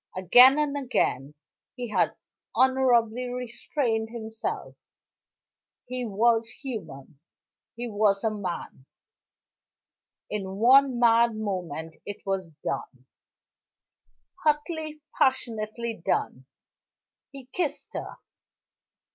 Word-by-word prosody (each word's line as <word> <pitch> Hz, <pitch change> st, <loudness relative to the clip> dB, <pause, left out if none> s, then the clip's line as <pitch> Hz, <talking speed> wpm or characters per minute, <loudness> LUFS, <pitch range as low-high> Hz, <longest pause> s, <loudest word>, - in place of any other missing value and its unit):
Again 250 Hz, -, +7 dB
and 295 Hz, -1 st, 0 dB
again 150 Hz, -, -1 dB, 0.4 s
he 245 Hz, -2 st, -5 dB
had -, -, +1 dB, 0.4 s
honorably 250 Hz, -2 st, +3 dB
restrained 245 Hz, -2 st, -2 dB
himself 225 Hz, -1 st, -5 dB, 1.1 s
he 250 Hz, 0 st, -4 dB
was 225 Hz, +2 st, +2 dB
human; 160 Hz, -, -8 dB, 0.6 s
he 240 Hz, +1 st, -4 dB
was 205 Hz, -2 st, +2 dB
a 220 Hz, -, +1 dB
man 180 Hz, -9 st, -6 dB, 1.4 s
in 195 Hz, -2 st, -4 dB
one 260 Hz, +4 st, +5 dB
mad 235 Hz, -1 st, +4 dB
moment 180 Hz, -7 st, -4 dB
it 205 Hz, -, -6 dB
was 190 Hz, -4 st, -2 dB
done, 130 Hz, -2 st, -5 dB, 1.4 s
hotly, 305 Hz, 0 st, 0 dB, 0.2 s
passionately 230 Hz, -4 st, 0 dB
done 130 Hz, -5 st, -1 dB, 0.8 s
he 275 Hz, -2 st, -10 dB
kissed 345 Hz, -5 st, -2 dB
her. -, -, -5 dB
230 Hz, 90 wpm, -27 LUFS, 195-255 Hz, 1.4 s, Again